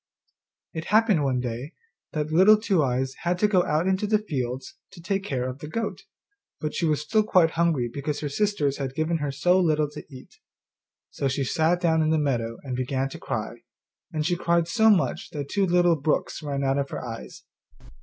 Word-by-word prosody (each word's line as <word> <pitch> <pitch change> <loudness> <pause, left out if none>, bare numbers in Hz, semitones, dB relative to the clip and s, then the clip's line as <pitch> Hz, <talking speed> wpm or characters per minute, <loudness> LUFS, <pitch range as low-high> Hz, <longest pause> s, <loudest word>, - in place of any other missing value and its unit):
It 160 0 -5
happened 210 -6 +3
one 130 -2 +1
day 125 +5 -5 0.4
that 155 -1 -2
Little 190 +6 +7
Two 195 -6 +2
eyes 130 0 0
had 175 +1 0
to 210 - +3
go 185 -4 +3
out 155 +3 +1
into 190 +2 +1
the 215 +1 +3
fields 130 - -4 0.2
to - - -12
take 195 +3 -2
care 130 -9 -2
of 130 +1 -6
the 150 - -7
goat, 225 +9 -4 0.5
but 155 -1 -3
she 170 - 0
was 150 -1 +1
still 185 +9 +2
quite 180 -6 +3
hungry 165 -7 +1
because 145 +4 -4
her 150 - -2
sisters 145 -3 0
had 135 -2 -4
given 160 +2 0
her 145 -2 -2
so 175 +7 +3
little 155 -4 +2
to 150 - -8
eat. 130 -1 -13 0.7
So 140 - -2
she 135 +1 -1
sat 160 +6 +1
down 160 -2 +3
in 155 - +2
the 160 - +3
meadow 120 -6 -1
and 130 -3 -4
began 130 +1 -1
to - - -9
cry, 115 +1 -4 0.5
and 155 -3 -2
she 175 +1 +1
cried 170 -1 +1
so 220 +4 +4
much 200 -4 +1
that 145 -2 -5
two 200 -2 +1
little 175 -1 +4
brooks 150 +1 -1
ran 140 -2 -3
out 135 +1 +1
of 140 0 -2
her - - -5
eyes. 115 - -8
155 Hz, 205 wpm, -25 LUFS, 135-175 Hz, 0.7 s, Little